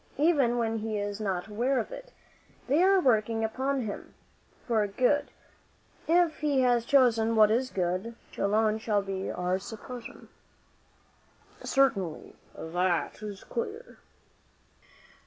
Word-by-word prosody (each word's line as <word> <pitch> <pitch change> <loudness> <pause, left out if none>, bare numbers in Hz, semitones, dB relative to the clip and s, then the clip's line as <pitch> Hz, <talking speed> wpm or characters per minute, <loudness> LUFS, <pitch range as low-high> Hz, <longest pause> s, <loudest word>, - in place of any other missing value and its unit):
Even 280 -6 +3
when 225 -1 0
he 215 0 -3
is 205 +1 -4
not 190 -4 -2
aware 240 +6 0
of - - -4
it, - - -9 0.5
they 285 +6 +2
are 385 +1 +5
working 225 -6 +2
upon 265 +5 -1
him, 215 -4 -7 0.5
for 220 -4 +1
good, 255 +8 +1 0.8
if 335 -1 +3
he 285 -3 +1
has 245 -2 +2
chosen 230 -4 +3
what 215 -1 +6
is 255 +3 +1
good, 185 +4 -2 0.2
which - - -13
alone 215 +2 +2
shall 210 -2 0
be 195 -1 -4
our 180 +1 -1
supposition." 230 +4 -9 1.4
"Certainly; 195 -12 0 0.2
that 175 +4 -1
is 205 -2 -7
clear." 470 +1 -6
225 Hz, 125 wpm, -28 LUFS, 205-270 Hz, 1.4 s, what